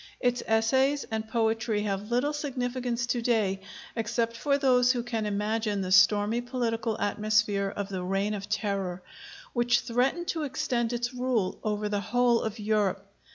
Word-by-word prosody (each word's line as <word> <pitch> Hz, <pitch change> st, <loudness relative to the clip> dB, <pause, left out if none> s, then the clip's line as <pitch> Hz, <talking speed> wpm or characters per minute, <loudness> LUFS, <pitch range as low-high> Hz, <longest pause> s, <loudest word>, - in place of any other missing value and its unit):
Its 245 Hz, -1 st, +1 dB
essays 265 Hz, +6 st, +2 dB
and 220 Hz, 0 st, -3 dB
poetry 225 Hz, -2 st, 0 dB
have 200 Hz, 0 st, -3 dB
little 250 Hz, +5 st, +1 dB
significance 250 Hz, -4 st, -2 dB
to 240 Hz, 0 st, -1 dB
day 215 Hz, -5 st, +1 dB, 0.3 s
except 230 Hz, +1 st, -1 dB
for 280 Hz, +3 st, +1 dB
those 250 Hz, -3 st, +4 dB
who 240 Hz, -2 st, -2 dB
can 225 Hz, -3 st, -2 dB
imagine 210 Hz, 0 st, -1 dB
the 185 Hz, -1 st, -3 dB
stormy 205 Hz, +5 st, +5 dB
political 235 Hz, -3 st, -2 dB
atmosphere 205 Hz, -1 st, +1 dB
of 200 Hz, -1 st, -3 dB
the 190 Hz, -2 st, -3 dB
Reign 195 Hz, +3 st, -1 dB
of 200 Hz, 0 st, -5 dB
Terror, 195 Hz, -4 st, -2 dB, 0.5 s
which 240 Hz, 0 st, +2 dB
threatened 265 Hz, +9 st, 0 dB
to 325 Hz, -, -1 dB
extend 270 Hz, -5 st, -1 dB
its 240 Hz, +1 st, -2 dB
rule 250 Hz, -6 st, -1 dB
over 210 Hz, -1 st, -1 dB
the 205 Hz, -1 st, -1 dB
whole 245 Hz, +2 st, +2 dB
of 220 Hz, 0 st, -3 dB
Europe. 205 Hz, -2 st, 0 dB
225 Hz, 155 wpm, -28 LUFS, 205-245 Hz, 0.5 s, stormy